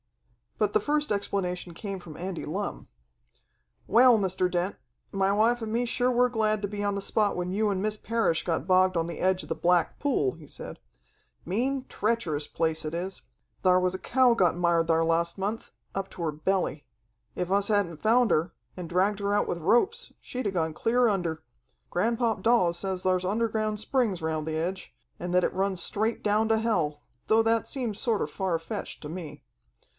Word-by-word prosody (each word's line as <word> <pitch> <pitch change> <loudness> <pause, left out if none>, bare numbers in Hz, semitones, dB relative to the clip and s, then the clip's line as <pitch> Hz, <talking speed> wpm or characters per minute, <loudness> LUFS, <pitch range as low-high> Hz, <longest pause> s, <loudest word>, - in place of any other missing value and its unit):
But - - +1
the 430 - +4
first 300 -4 0
explanation 180 -3 -2
came 195 0 -5
from 165 -4 -11
Andy 180 0 -4
Lumm. 195 +6 -4 1.0
"Well, 240 +2 +6
Mr. 185 -2 +1
Dent, 180 +2 -1 0.4
my 195 0 +1
wife 230 +4 +2
and 220 -1 -4
me 235 +2 +1
sure 245 +1 +1
were 250 0 +3
glad 215 -3 +1
to - - +1
be 205 0 -4
on 205 0 0
the 200 - -3
spot 205 +1 +1
when 180 0 -2
you 210 +2 +1
and 190 -2 -1
Miss 215 +1 -1
Parrish 225 -7 0
got 165 -3 -2
bogged 185 -1 +4
on 165 0 0
the 170 - -6
edge 185 0 +2
of - - -12
the - - -1
Black 175 -1 +1
Pool," 250 - +1
he 160 -3 -14
said. - - -8 0.7
"Mean, 255 +8 -1
treacherous 180 -10 -1
place 160 -1 -1
it 155 - -4
is. 185 +2 -4 0.4
Thar 185 -1 +5
was 185 0 +1
a 185 - -4
cow 255 +2 +3
got 180 -7 +3
mired 170 -1 +2
thar 165 0 +3
last 170 +2 +1
month, 205 +4 -3 0.2
up 195 0 -3
to - - -9
her 160 - 0
belly. 155 -1 -1 0.5
If 180 +1 -3
us 200 0 +2
hadn't 200 -7 0
found 235 +1 +4
her, 160 +3 +1 0.2
and 180 -3 -7
dragged 195 +4 +1
her 200 0 0
out - - +1
with 170 - -2
ropes, 380 - +1
she'd 255 -1 -6
have 195 -2 -1
gone 160 -2 0
clear 240 +8 +2
under. 175 -6 -2 0.5
Granpop 225 +2 0
Dawes 225 -8 +3
says 190 0 -2
thar's 185 -1 +1
underground 215 +1 0
springs 220 -5 0
around 160 -1 -2
the 160 0 -2
edge, 180 +4 -4 0.2
and 175 0 -4
that 180 0 +4
it - - 0
runs 190 -1 0
straight 220 +6 -1
down 215 +1 +2
to 225 - +4
hell, 170 -10 0 0.3
though 225 +1 +4
that 225 0 +1
seems 240 -7 -3
sorter 225 -4 0
far 190 -4 -1
fetched 165 - -6
to 150 - -6
me. 155 -3 -8
195 Hz, 195 wpm, -27 LUFS, 175-220 Hz, 1.0 s, Well